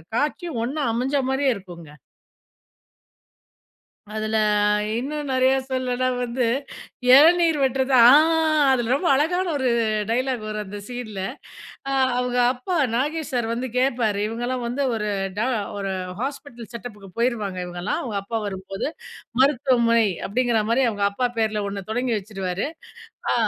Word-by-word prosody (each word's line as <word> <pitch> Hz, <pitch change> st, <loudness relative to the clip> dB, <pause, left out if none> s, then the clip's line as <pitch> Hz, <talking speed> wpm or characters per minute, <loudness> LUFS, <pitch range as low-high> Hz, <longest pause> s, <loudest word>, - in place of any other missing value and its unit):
காட்சியும் 300 Hz, -1 st, -1 dB
ஒண்ணா 290 Hz, +3 st, -2 dB
அமைஞ்ச 260 Hz, +4 st, -1 dB
மாதிரியே 265 Hz, 0 st, +2 dB
இருக்குங்க. 175 Hz, -5 st, -11 dB, 2.2 s
அதுல 215 Hz, 0 st, -2 dB, 0.6 s
இன்னும் 290 Hz, +3 st, -3 dB
நெறைய 260 Hz, 0 st, +3 dB, 0.2 s
சொல்னுனா 255 Hz, -1 st, -1 dB
வந்து, 245 Hz, 0 st, -1 dB, 0.6 s
இளநீர் 325 Hz, +3 st, +6 dB
வெட்டுறது 265 Hz, 0 st, +1 dB
ஆ 235 Hz, -, +9 dB, 0.6 s
அதில 240 Hz, -1 st, +1 dB
ரொம்ப 340 Hz, +5 st, -1 dB
அழகான 355 Hz, +7 st, +1 dB
ஒரு 260 Hz, -2 st, 0 dB, 0.4 s
டயலாக் 250 Hz, -1 st, -1 dB
வரும் 215 Hz, 0 st, -4 dB
அந்த 205 Hz, +1 st, -8 dB
சீன்ல. 230 Hz, -6 st, -6 dB, 1.0 s
அவங்க 250 Hz, 0 st, -1 dB
அப்பா 260 Hz, +8 st, -4 dB, 0.2 s
நாகேஷ் 300 Hz, +4 st, -1 dB
சார் 240 Hz, -2 st, 0 dB
வந்து 250 Hz, +2 st, -3 dB
கேப்பாரு, 235 Hz, -6 st, +1 dB
இவங்கலாம் 240 Hz, +2 st, -3 dB
வந்து 270 Hz, +4 st, -1 dB
ஒரு 210 Hz, -1 st, -2 dB, 0.3 s
டா 240 Hz, -, +1 dB, 0.3 s
ஒரு 195 Hz, -1 st, -3 dB, 0.3 s
ஹாஸ்பிட்டல் 270 Hz, -4 st, -6 dB
செட்டப்புக்கு 210 Hz, -4 st, -9 dB
போயிருவாங்க 215 Hz, -6 st, -1 dB
இவங்கலாம், 175 Hz, +2 st, -3 dB
அவங்க 215 Hz, -5 st, -3 dB
அப்பா 225 Hz, +3 st, -3 dB
வரும்போது. 195 Hz, +3 st, -4 dB, 0.5 s
மருத்துவமனை 240 Hz, -5 st, +3 dB, 0.2 s
அப்படிங்கிற 235 Hz, +1 st, +1 dB
மாரி 260 Hz, +3 st, +3 dB
அவங்க 205 Hz, -2 st, -3 dB
அப்பா 250 Hz, +4 st, 0 dB
பேர்ல 215 Hz, -2 st, 0 dB
ஒண்ணு 200 Hz, -1 st, -6 dB
தொடங்கி 245 Hz, 0 st, 0 dB
வச்சுருவாரு. 195 Hz, +1 st, -4 dB, 0.6 s
ஆ -, -, +3 dB
245 Hz, 125 wpm, -23 LUFS, 215-265 Hz, 2.2 s, ஆ